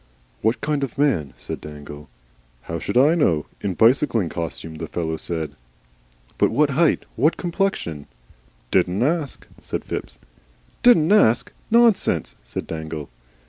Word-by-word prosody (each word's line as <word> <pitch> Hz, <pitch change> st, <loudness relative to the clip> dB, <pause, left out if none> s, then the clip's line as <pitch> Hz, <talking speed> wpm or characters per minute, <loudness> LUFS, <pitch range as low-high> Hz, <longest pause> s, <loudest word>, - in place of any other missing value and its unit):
"What 110 Hz, +3 st, +1 dB
kind 150 Hz, -2 st, 0 dB
of 135 Hz, -, -4 dB
man?" 90 Hz, -, +1 dB
said -, -, -6 dB
Dangle. 75 Hz, 0 st, -10 dB, 0.5 s
"How 85 Hz, 0 st, -4 dB
should 100 Hz, +8 st, -2 dB
I 140 Hz, +5 st, +6 dB
know? 85 Hz, -, +2 dB, 0.2 s
in 95 Hz, -3 st, -2 dB
bicycling 115 Hz, -, +3 dB
costume, 80 Hz, -1 st, -5 dB
the -, -, -5 dB
fellow 80 Hz, -2 st, -2 dB
said." 80 Hz, -2 st, -4 dB, 0.9 s
"But -, -, +4 dB
what 140 Hz, +5 st, +2 dB
height? 155 Hz, +4 st, +2 dB
What 150 Hz, +8 st, +2 dB
complexion?" 170 Hz, -, -2 dB, 0.6 s
"Didn't 95 Hz, +6 st, +2 dB
ask," 150 Hz, -1 st, -1 dB, 0.2 s
said -, -, -4 dB
Phipps. -, -, -5 dB, 0.6 s
"DIDN'T 200 Hz, -9 st, +5 dB
ASK! 120 Hz, -, +4 dB, 0.2 s
Nonsense," 230 Hz, -2 st, +3 dB
said -, -, -5 dB
Dangle. 80 Hz, -3 st, -6 dB
110 Hz, 135 wpm, -22 LUFS, -, 0.9 s, I